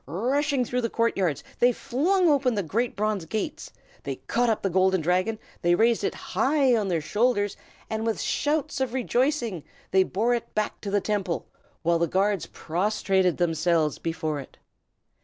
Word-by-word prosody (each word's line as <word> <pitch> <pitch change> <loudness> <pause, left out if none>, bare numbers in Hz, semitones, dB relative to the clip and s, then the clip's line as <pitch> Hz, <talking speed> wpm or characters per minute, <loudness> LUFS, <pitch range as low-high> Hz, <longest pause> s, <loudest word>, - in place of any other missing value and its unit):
Rushing 260 - 0
through 250 +2 -1
the 230 - -1
court 230 +1 +1
yards, 175 -8 0 0.2
they 245 +1 +5
flung 300 - +1
wide 315 - +6
open 260 -4 +1
the 200 - 0
great 230 +9 -1
bronze 210 -3 -1
gates. 220 - -4 0.3
They - - -4
caught 240 0 0
up 220 - 0
the 195 - +1
Golden 190 +1 +3
Dragon, 185 +7 +1 0.2
they 175 0 +3
raised 230 +2 +3
it - - -1
high 265 +5 +2
on 215 -3 0
their 170 -4 0
shoulders, 205 +3 +1 0.3
and 220 0 -3
with 225 -1 -1
shouts 300 -2 -1
of 260 -1 -1
rejoicing 245 - 0 0.3
they 190 - +5
bore 215 +6 +1
it 235 - -4
back 215 0 -2
to 205 - -4
the 200 0 +1
Temple, 195 -4 -2 0.4
while 170 0 +2
the 170 - +2
guards 195 +2 +1
prostrated 190 0 0
themselves 165 -2 +1
before 160 -2 -2
it. 135 - -11
210 Hz, 175 wpm, -26 LUFS, 180-245 Hz, 0.4 s, wide